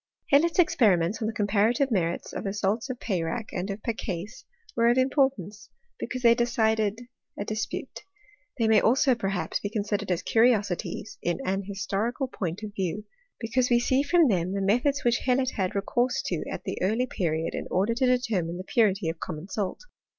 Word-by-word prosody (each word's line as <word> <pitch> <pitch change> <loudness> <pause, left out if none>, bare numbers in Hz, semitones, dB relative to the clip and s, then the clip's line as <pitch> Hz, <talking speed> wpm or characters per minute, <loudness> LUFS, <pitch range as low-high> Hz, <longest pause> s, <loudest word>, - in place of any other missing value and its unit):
Hellot's 320 +4 +4
experiments 210 - +3
on 215 - 0
the - - -1
comparative 220 +6 +1
merits 175 -5 -1
of - - -4
the 195 - -2
salts 210 +5 -1
of 255 - -3
Peyrac, 195 +2 -2
and 185 +2 -3
of 200 +2 -5
Pecais 210 -4 -4 0.3
were 230 - +3
of 240 - +3
importance, 260 - 0 0.3
because 255 0 -4
they 235 -1 +7
decided 220 -2 +1 0.4
a 200 - -3
dispute 215 0 -4 0.3
— 300 -8 -33
they 230 -3 +2
may 220 -1 +5
also 260 +3 +4
per 230 -5 -3
haps 180 -4 -2
be 205 - -4
considered 205 -2 -2
as 180 -2 0
curiosities 220 -2 +1
in 175 0 -1
an 195 +1 -1
historical 205 +6 -2
point 185 -5 -4
of 210 -1 -6
view; 200 +1 -3 0.3
because 245 +2 0
we 240 -1 +4
see 260 +2 +2
from 330 +2 +4
them 185 -4 0
the - - -1
methods 245 +9 +1
which 240 0 +2
Hellot 255 0 +2
had 190 -1 -2
recourse 240 +6 0
to - - -2
at - - -5
that - - -4
early 220 +7 +1
period 165 -8 -2
in - - -4
order 200 +5 +1
to 255 +2 +1
determine 220 -10 0
the 185 - -6
purity 195 -3 +2
of 165 0 -3
common 165 +2 -6
salt. 195 -1 -3
215 Hz, 185 wpm, -27 LUFS, 195-245 Hz, 0.4 s, they